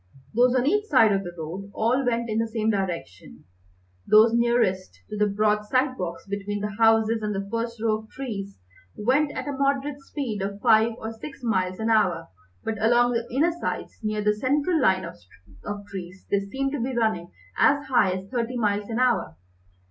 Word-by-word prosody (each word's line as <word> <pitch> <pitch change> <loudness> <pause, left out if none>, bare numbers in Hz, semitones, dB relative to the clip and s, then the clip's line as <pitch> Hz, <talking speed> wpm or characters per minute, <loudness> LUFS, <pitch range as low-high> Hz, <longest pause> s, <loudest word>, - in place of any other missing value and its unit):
Those 245 +2 +4
on 255 0 +2
each 415 +8 +2
side 255 - +5
of 195 -1 +1
the 175 - -6
road 175 +5 -6
all 245 +5 +1
went 235 -1 0
in 220 0 -1
the 230 - 0
same 220 0 0
direction. 165 - -5 0.6
Those 220 +2 +6
nearest 235 - +1
to - - -3
the 210 0 +2
broad 210 +1 +1
side 255 +3 +1
walks 170 -6 -5
between 200 +1 -4
the 210 0 -2
houses 225 +1 +3
and 210 -1 -2
the 195 0 -3
first 230 0 -3
row 215 -1 +1
of 220 0 -15
trees 205 -7 -6 0.4
went 265 +7 +2
at - - -5
a - - -1
moderate 275 +1 -1
speed 255 -7 -4
of 200 +1 -4
five 220 +2 +4
or 220 -1 -5
six 270 +4 -10
miles 185 -5 0
an 225 +1 0
hour, 185 -7 +2 0.3
but 220 -1 -3
along 240 +2 +4
the 235 0 -2
inner 300 +8 +2
sides, 345 - -5
near 215 -1 -2
the 210 0 +3
central 290 +8 +1
line 185 -5 +3
of 170 - -9 0.7
trees, 190 -2 -9
they 200 - +3
seemed 265 +8 -3
to 290 - -3
be 255 +1 -2
running 220 -7 0 0.3
as 285 +1 +4
high 255 -8 +3
as 190 +1 -4
thirty 245 0 -2
miles 205 -2 0
an 225 - -2
hour. 250 - +1
220 Hz, 195 wpm, -25 LUFS, 200-250 Hz, 0.7 s, Those